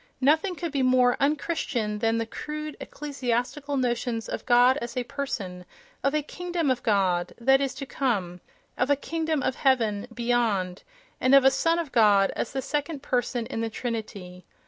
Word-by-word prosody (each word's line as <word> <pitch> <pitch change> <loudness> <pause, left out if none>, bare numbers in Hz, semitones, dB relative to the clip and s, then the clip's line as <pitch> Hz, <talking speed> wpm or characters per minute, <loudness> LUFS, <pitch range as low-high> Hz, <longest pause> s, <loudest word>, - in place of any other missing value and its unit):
Nothing 315 +7 +2
could 340 -2 -4
be 280 -2 0
more 255 -1 +4
un 285 +2 +3
Christian 235 -10 -2
than 225 +1 +1
the 230 - -1
crude 305 +6 -6
ecclesiastical 280 0 -3
notions 240 -2 -1
of - - -5
God 245 +2 +5
as 240 -2 -6
a 250 - 0
person, 200 -10 -5 0.4
of 275 +2 +1
a 305 - +1
"kingdom 345 -2 -2
of 255 - -1
God" 185 -5 +1
that 270 +3 +4
is 275 -1 -1
to 275 - -6
come, 195 -11 -2 0.4
of 250 - +1
a 285 - +5
"kingdom 315 0 -2
of 260 - -1
heaven" 230 -5 +1
beyond, 230 -6 0 0.4
and 255 +2 +5
of 275 -1 +6
a 270 - +7
"son 330 +5 +1
of 330 -5 -3
God" 205 -4 +4
as - - -3
the 265 - -3
second 290 +1 -3
person 245 -1 -1
of 225 - -2
the 225 - -1
Trinity. 215 -6 -6
250 Hz, 180 wpm, -26 LUFS, 225-285 Hz, 0.4 s, a